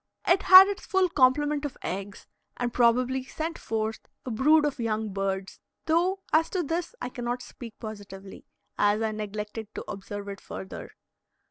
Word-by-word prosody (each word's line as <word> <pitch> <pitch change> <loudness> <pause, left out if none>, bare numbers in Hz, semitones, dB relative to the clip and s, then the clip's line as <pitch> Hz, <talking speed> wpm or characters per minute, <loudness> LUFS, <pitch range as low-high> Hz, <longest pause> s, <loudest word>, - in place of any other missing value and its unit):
It 360 +3 +4
had 375 +1 +10
its 400 -1 -5
full 380 -1 +2
complement 290 +1 +2
of 290 - -5
eggs, 195 +2 -5 0.3
and 240 -1 -2
probably 250 +2 +2
sent 320 +5 -5
forth 220 0 -2 0.3
a 255 - -4
brood 295 +7 +4
of 290 -3 -2
young 220 -2 -2
birds, 195 -1 -3 0.3
though 360 +4 +1
as 320 +1 +4
to 365 -2 -1
this 335 - -3
I - - -4
cannot 245 0 -4
speak 230 -3 -11
positively, 200 -3 -9 0.4
as 205 +2 +3
I 220 - 0
neglected 210 +1 -5
to - - -6
observe 200 0 -7
it 200 -1 -8
further. 190 - -8
240 Hz, 160 wpm, -27 LUFS, 210-310 Hz, 0.4 s, had